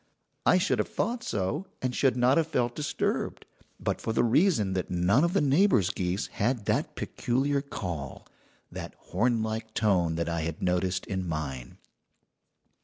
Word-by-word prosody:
"I - - +6
should 185 +2 +1
have - - +1
thought 235 +3 -2
so, 105 - -2
and 130 -1 -2
should 130 -3 +2
not 125 +4 +4
have 165 -1 +2
felt 125 -6 0
disturbed, 150 -1 -2 0.3
but - - -2
for 115 - -2
the - - +3
reason 120 - +3
that 95 -1 -2
none 90 - +3
of 170 +1 +1
the 200 - +3
neighbours' 140 - +4
geese 90 +2 -1
had 115 0 -1
that - - 0
peculiar 135 +3 0
call 90 - -6 0.5
that - - -7 0.2
hornlike 110 -2 0
tone 90 -6 +2
that 85 0 -1
I 85 -1 -1
had 80 0 -4
noticed 90 +1 0
in 95 -2 -3
mine. 70 -6 -4
110 Hz, 160 wpm, -28 LUFS, 90-140 Hz, 0.5 s, I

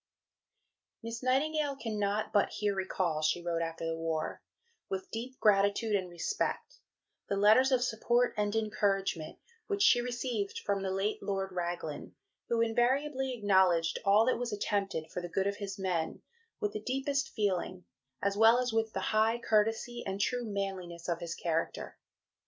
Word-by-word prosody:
"Miss 230 0 -5
Nightingale 285 +3 +1
cannot 215 -3 -2
but 205 - +4
here 205 -1 0
recall," 185 -4 -1
she 160 +3 +2
wrote 170 -1 -2
after 165 0 -3
the 165 0 -1
war, 165 -1 -3 0.5
"with 190 0 -4
deep 250 +3 -6
gratitude 205 +1 +3
and 185 -2 -1
respect, 175 - -3 0.5
the 200 - +1
letters 215 +7 +5
of 250 -2 +3
support 240 +1 +1
and 210 0 0
encouragement 195 -6 0 0.3
which 405 -1 +1
she 245 -9 +6
received 240 -4 -3
from 200 -1 0
the 190 - -2
late 195 +3 -1
Lord 195 -1 -2
Raglan, 175 -4 -4 0.3
who 230 -1 +2
invariably 260 +3 +1
acknowledged 190 -6 +3
all 205 +3 +5
that 255 - +1
was 245 -1 -2
attempted, 200 -6 -2
for 180 - -4
the 175 - -6
good 190 +3 0
of 200 0 -1
his 195 -2 -5
men, 180 -4 -2 0.4
with 210 - -1
the 215 - -4
deepest 275 +5 -1
feeling, 185 - -2 0.4
as 200 0 +1
well 225 +3 +6
as 250 -2 0
with 225 0 0
the - - -2
high 220 +2 +3
courtesy 225 +2 +1
and 195 0 -3
true 245 +4 0
manliness 190 -5 -4
of 170 -1 -1
his 170 -1 -5
character. 165 -1 -3
205 Hz, 160 wpm, -31 LUFS, 185-235 Hz, 0.5 s, she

